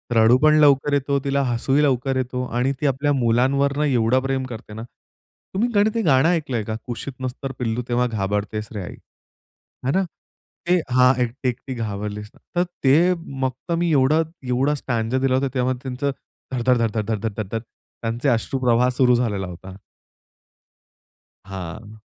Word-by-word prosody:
रडू 115 +2 +6
पण 155 0 +6
लवकर 145 -1 +4
येतो, 140 0 +1
तिला 140 0 +1
हसूही 135 +5 +2
लवकर 135 -1 +1
येतो 125 0 -2
आणि 125 +3 0
ती 150 - +2
आपल्या 140 +2 +1
मुलांवर 135 +3 +2
ना 150 - +2
एवढं 125 -2 +3
प्रेम 135 0 -1
करते 115 -3 -9
ना. 110 +1 -6 0.7
तुम्ही 220 +6 +1 0.3
ते 230 - +1
गाणं 140 -4 +4
ऐकलंय 150 -10 0
का? 110 +1 -4
कुशीत 125 +3 -5
नस 130 -1 -2
तर 135 - -2
पिल्लू 115 0 -1
तेव्हा 125 +1 +2
घाबरतेच 105 0 -2
रे 105 - -4
आई. - - -8 0.9
आहे 135 - +2
ना 195 - +3 0.6
ते 180 +1 +4
हां, 125 +1 +5
एकटी, 125 +2 -2
एकटी 125 +2 -5
घाबरलीस 105 -2 -4
ना. - - -22 0.2
तर - - +4 0.2
ते 160 +7 +5 0.3
फक्त 130 +6 -3
मी 170 0 +1
एवढा 150 +2 +4 0.3
एवढा 135 +4 +1
स्टँजा 120 -3 -1
दिला 130 -1 +2
होता 135 +1 +1
तेव्हा 130 0 +1
त्यांचं 135 +2 -2 0.4
धड-धड, 125 0 +2
धड-धड, 115 -2 0
धड-धड, 110 +1 -1
धड-धड 110 +1 -3 0.4
त्यांचे 115 +4 -1
अश्रु 125 +2 0
प्रवाह 125 0 +3
सुरू 125 -1 +5
झालेला 105 -6 -1
होता. 95 +2 -10 1.7
हां. 100 +3 -8
125 Hz, 165 wpm, -22 LUFS, 115-140 Hz, 1.7 s, रडू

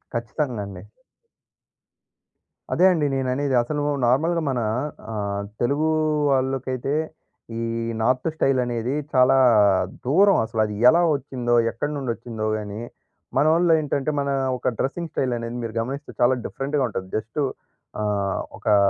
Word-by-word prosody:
ఖచ్చితంగండి. 115 - -3 1.9
అదే 180 - +4
అండి 155 -4 0
నేననేది. 130 +1 0
అసలూ 145 +4 -2 0.2
నార్మల్‌గా 165 +7 +2
మనా 125 -4 -1 0.5
ఆహ్, 100 -1 -3 0.2
తెలుగూ 145 +6 +1 0.4
వాళ్ళుకైతే, 130 0 -1 0.7
ఈ - - -2 0.4
నార్త్ 125 +6 +1
స్టైలనేదీ 125 -3 0 0.2
చాలా 130 +1 +5 0.7
దూరం. 195 +10 +5
అసలది 110 -2 -1
ఎలా 170 +6 +4
ఒచ్చిందో, 125 -3 -1 0.2
ఎక్కడి 145 +6 -3
నుండొచ్చిందో 115 -4 -4
గానీ, 105 +1 -6 0.6
మనోళ్ళు 165 +3 +4
ఏంటంటే, 145 -1 -1
మనా 140 0 0 0.2
ఒక - - 0
డ్రస్సింగ్ 160 +4 -2
స్టైలనేది 120 -2 -2
మీరు 115 0 -5
గమనిస్తే 135 +5 -6
చాలా 120 +2 +5
డిఫరెంట్‌గా 140 +1 -2
ఉంటది. 95 -3 -5
జస్టు 115 +7 -3 0.6
ఆ! - - -1 0.5
ఒకా 105 - +2
130 Hz, 110 wpm, -23 LUFS, 115-145 Hz, 1.9 s, చాలా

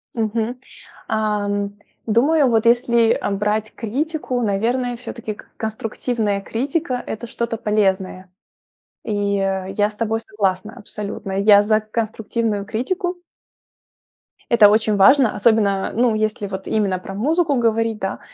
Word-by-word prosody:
Мгм, 225 +2 -1 0.5
ам, 205 -2 -1 0.3
думаю, 275 +7 +3
вот 225 -1 +2
если, 235 -1 +4
а, - - -1
брать 210 +2 -1
критику, 260 +2 -2
наверное, 240 +4 0
всё-таки 235 -2 -6
к - - -16
конструктивная 220 -1 -2
критика- 260 - -2
это 235 +2 -6
что-то 235 0 -3
полезное, 190 -3 -1 0.7
и, 205 -1 0
э, 195 -1 -2
я 205 0 +3
с - - -17
тобой 225 +1 -1
согласна 210 -1 -2
абсолютно, 205 -1 -7
я 205 0 +7
за 215 +1 +2
конструктивную 220 -1 -2
критику. 355 - -3 1.3
Это 220 -3 +7
очень 215 0 +2
важно, 250 +4 +5
особенно, 205 -3 +2
ну, 235 0 +3
если 215 -1 -1
вот 190 0 -6
именно 200 -4 0
про 195 +1 -8
музыку 305 - +1
говорить, 225 -2 +1
да, 195 -1 -3
220 Hz, 130 wpm, -20 LUFS, 205-235 Hz, 1.3 s, я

